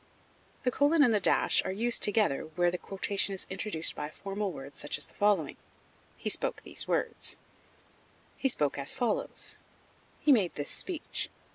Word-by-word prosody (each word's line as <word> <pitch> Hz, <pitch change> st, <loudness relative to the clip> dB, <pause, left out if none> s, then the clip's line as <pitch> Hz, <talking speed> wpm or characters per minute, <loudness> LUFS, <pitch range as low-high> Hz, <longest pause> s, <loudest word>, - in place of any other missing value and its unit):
The 250 Hz, -, +2 dB
colon 290 Hz, +4 st, +4 dB
and 240 Hz, -4 st, +5 dB
the 210 Hz, -, +4 dB
dash -, -, +4 dB
are -, -, -2 dB
used 230 Hz, +5 st, 0 dB
together 205 Hz, -9 st, +2 dB
where 175 Hz, -1 st, +3 dB
the 180 Hz, -, -3 dB
quotation 195 Hz, 0 st, -2 dB
is 190 Hz, -, -2 dB
introduced 190 Hz, -4 st, -2 dB
by 150 Hz, -, -4 dB
formal 195 Hz, +3 st, -3 dB
words 135 Hz, -3 st, -9 dB
such 145 Hz, -, -1 dB
as -, -, 0 dB
the -, -, -18 dB
following: 200 Hz, -8 st, +2 dB, 0.6 s
"He -, -, -6 dB
spoke -, -, 0 dB
these -, -, -4 dB
words," -, -, 0 dB, 1.0 s
"he 270 Hz, -, +1 dB
spoke 145 Hz, -, 0 dB
as 140 Hz, -, +1 dB
follows," 245 Hz, -5 st, -1 dB, 0.6 s
"he 300 Hz, -, +4 dB
made 205 Hz, -10 st, +4 dB
this 145 Hz, -, -3 dB
speech." 355 Hz, -5 st, -3 dB
200 Hz, 165 wpm, -31 LUFS, 170-235 Hz, 1.0 s, and